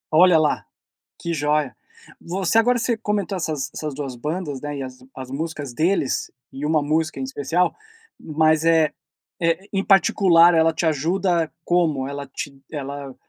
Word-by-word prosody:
Olha 175 0 +7
lá, 155 -1 +1 0.6
que 170 -1 -3
joia. 150 -2 0 0.4
Você 185 +4 -1
agora 245 +2 +3
você 230 0 0
comentou 210 -2 -2
essas 155 -6 -3
essas 150 -2 -4
2 135 -3 -5
bandas, 150 +2 -4
né, 145 -1 -4
e - - -3
as 130 -1 -9
as 130 -1 -8
músicas 145 -2 -5
deles, 160 -1 0 0.2
e 135 +2 -7
uma 155 0 +2
música 155 -1 -1
em - - -2
especial. 145 +7 0 0.4
Mas 155 0 +2
é 165 -2 +4 0.5
eh, 170 +4 0
em 195 -1 0
particular, 175 -2 +5
ela 165 0 +4
te 160 +1 -2
ajuda 165 +2 +1
como? 155 -7 +1
Ela 140 0 -6
te 135 +1 -7
ela 140 -2 -6
160 Hz, 160 wpm, -22 LUFS, 140-175 Hz, 0.6 s, Olha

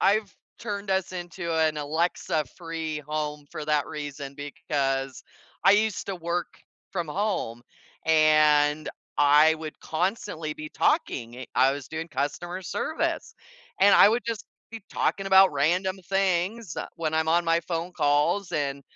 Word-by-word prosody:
I've 205 +1 +2 0.3
turned 205 -3 -5
us 190 -1 0
into 175 -1 -5
an 155 -1 +2
Alexa-free 160 0 -2
home 150 -1 -3
for 155 - -6
that 150 -2 +1
reason, 145 -2 -6
because 135 -2 -2 0.4
I - - +8
used 215 0 +1
to 195 - -3
work 170 +1 -2 0.4
from 175 -4 -2
home 170 - -2 0.4
and 155 -1 +4 0.3
I 150 +2 +6
would 155 -1 -8
constantly 165 -2 -2
be 155 0 -7
talking, 130 - 0
i 130 - -7 0.2
I - - +2
was 140 -1 -7
doing 160 +1 -5
customer 160 +6 -3
service 205 - -2 0.5
and 200 +1 +7
I - - +8
would 235 +3 +1
just 230 -3 -3 0.3
keep 225 -3 -8
talking 195 - -1
about 190 -2 +6
random 180 +7 +1
things 195 +1 0 0.2
when 160 -2 -2
I'm 160 0 +1
on 170 +2 +3
my 165 0 +2
phone 170 +1 -4
calls 150 +5 +1
and 140 -2 -2
160 Hz, 140 wpm, -26 LUFS, 150-190 Hz, 0.5 s, I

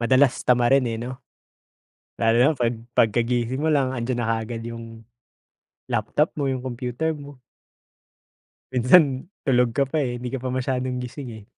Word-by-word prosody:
madalas 130 +2 +3
tamarin 125 +2 +4
eh, 115 - -2
'no? 125 +3 -6 1.0
Lalo 115 0 +3
na 130 +5 +5
'pag 120 -1 0 0.2
pagkagising 120 +3 +1
mo 160 +1 +1
lang, 135 -3 +2
andiyan 120 0 -2
na 115 - -2
kaagad 115 +1 -5
yung 115 -1 -8 0.8
laptop 120 +6 0
mo, 140 -2 -1
yung 130 -1 -3
computer 125 +5 -2
mo. 145 -3 -11 1.3
Minsan 130 +2 +4 0.2
tulog 125 -4 +2
ka 140 - +2
pa 160 - 0
eh, 125 -4 -1
hindi 125 0 -5
ka 135 - -3
pa 130 - -6
masyadong 130 0 -2
gising 125 +1 -7
eh. - - -19
125 Hz, 155 wpm, -24 LUFS, 120-135 Hz, 1.3 s, na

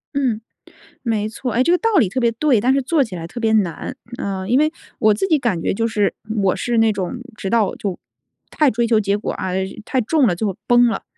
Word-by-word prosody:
嗯， 245 -6 0 0.6
没 215 -3 -1
错。 240 +2 -4
诶， 245 +3 +3
这 340 - +1
个 355 - +4
道 455 - +1
理 220 -9 +4
特 260 - -4
别 235 -1 +3
对， 250 -2 +2
但 260 +4 +3
是 275 - +1
做 290 +2 +2
起 195 - -8
来 165 -1 -6
特 235 - -8
别 220 -1 +2
难。 195 -7 0 0.2
呃， 190 -1 -3
因 250 +3 +4
为 310 +1 +2 0.3
我 215 -1 +4
自 300 - -1
己 310 -3 +4
感 220 -10 -1
觉 - - 0
就 230 +3 0
是 210 -3 +1 0.3
我 190 - +2
是 240 -2 -1
那 225 -1 +4
种 195 +3 -3 0.2
直 195 - -4
到 215 -2 +2
就 195 -4 -4 0.5
太 300 -4 +3
追 235 +2 0
求 225 -2 +3
结 200 -1 +1
果， 205 - -4
啊， 190 -2 -4 0.3
太 260 - 0
重 270 +3 +2
了 180 - +2
就 195 +1 -2
崩 245 0 +5
了， 225 - -2
225 Hz, 260 characters per minute, -20 LUFS, 200-255 Hz, 0.6 s, 崩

